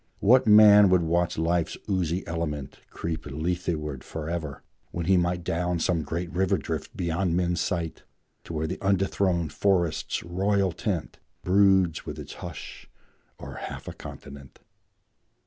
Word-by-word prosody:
What 125 Hz, +5 st, +5 dB
man 105 Hz, -1 st, +8 dB
would 90 Hz, -2 st, +4 dB
watch 85 Hz, +1 st, 0 dB
life's 85 Hz, +1 st, 0 dB
oozy 90 Hz, -2 st, -1 dB
element 75 Hz, -4 st, -4 dB
Creep 80 Hz, -1 st, -5 dB
Letheward 75 Hz, -2 st, -3 dB
forever, 80 Hz, -2 st, -5 dB, 0.3 s
when 85 Hz, -1 st, -4 dB
he 95 Hz, +2 st, +4 dB
might 90 Hz, 0 st, +1 dB
Down 90 Hz, +1 st, -1 dB
some 85 Hz, 0 st, 0 dB
great 85 Hz, +4 st, -4 dB
river 95 Hz, +1 st, +2 dB
drift -, -, -5 dB
beyond 85 Hz, 0 st, 0 dB
men's 90 Hz, -1 st, 0 dB
sight, 85 Hz, -2 st, -2 dB, 0.4 s
To -, -, -7 dB
where 80 Hz, 0 st, -1 dB
the 90 Hz, +4 st, -3 dB
undethronèd 95 Hz, -4 st, +1 dB
forest's 90 Hz, -5 st, 0 dB
royal 95 Hz, +2 st, +1 dB
tent 85 Hz, -1 st, -3 dB, 0.2 s
Broods 95 Hz, -3 st, +3 dB
with -, -, -7 dB
its -, -, -8 dB
hush -, -, -8 dB, 0.5 s
o'er -, -, -8 dB
half -, -, -7 dB
a -, -, -5 dB
continent? 70 Hz, -1 st, -11 dB
85 Hz, 140 wpm, -26 LUFS, 80-95 Hz, 0.5 s, man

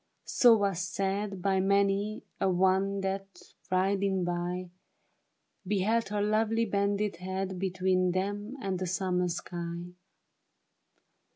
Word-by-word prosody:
So 235 Hz, -3 st, +6 dB
was 200 Hz, -4 st, 0 dB
said 195 Hz, +1 st, -2 dB
By 195 Hz, -1 st, +2 dB
many 200 Hz, +2 st, +1 dB, 0.2 s
a 195 Hz, -, +2 dB
one 190 Hz, +2 st, +2 dB
that, 195 Hz, 0 st, -5 dB, 0.2 s
riding 190 Hz, 0 st, +1 dB
by, 175 Hz, +1 st, -3 dB, 1.0 s
Beheld 210 Hz, +3 st, +1 dB
her 205 Hz, 0 st, 0 dB
lovely 220 Hz, +2 st, +2 dB
bended 200 Hz, -2 st, 0 dB
head 190 Hz, +1 st, -3 dB
Between 185 Hz, -1 st, +1 dB
them 205 Hz, +7 st, -2 dB
and 190 Hz, -2 st, -1 dB
the 185 Hz, -, -2 dB
summer 180 Hz, 0 st, 0 dB
sky. 170 Hz, 0 st, -5 dB
195 Hz, 110 wpm, -30 LUFS, 185-200 Hz, 1.0 s, So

